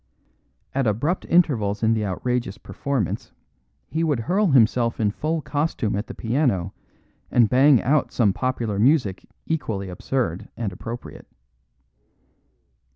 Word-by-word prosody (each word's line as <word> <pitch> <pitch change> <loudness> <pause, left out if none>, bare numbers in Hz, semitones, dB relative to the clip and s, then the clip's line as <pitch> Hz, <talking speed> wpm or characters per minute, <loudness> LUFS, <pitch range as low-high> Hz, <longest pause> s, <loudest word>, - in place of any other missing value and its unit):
At 135 -2 +1
abrupt 145 - -1
intervals 115 - +2
in 110 0 +4
the 110 -1 0
outrageous 105 +2 -2
performance 135 - -3 0.6
he 160 +1 -1
would 145 -7 +1
hurl 195 - +1
himself 120 -4 +3
in 105 -2 +2
full 155 +7 -2
costume 145 -8 -1
at 105 +3 -3
the - - -8
piano 110 - 0 0.6
and 120 -2 +4
bang 130 +2 +5
out 145 +4 +2
some 105 -6 +2
popular 120 -5 -2
music 120 - +2 0.2
equally 110 -12 -2
absurd 95 0 -2
and 110 -5 -3
appropriate. 115 +6 -8
120 Hz, 125 wpm, -23 LUFS, 105-145 Hz, 0.6 s, bang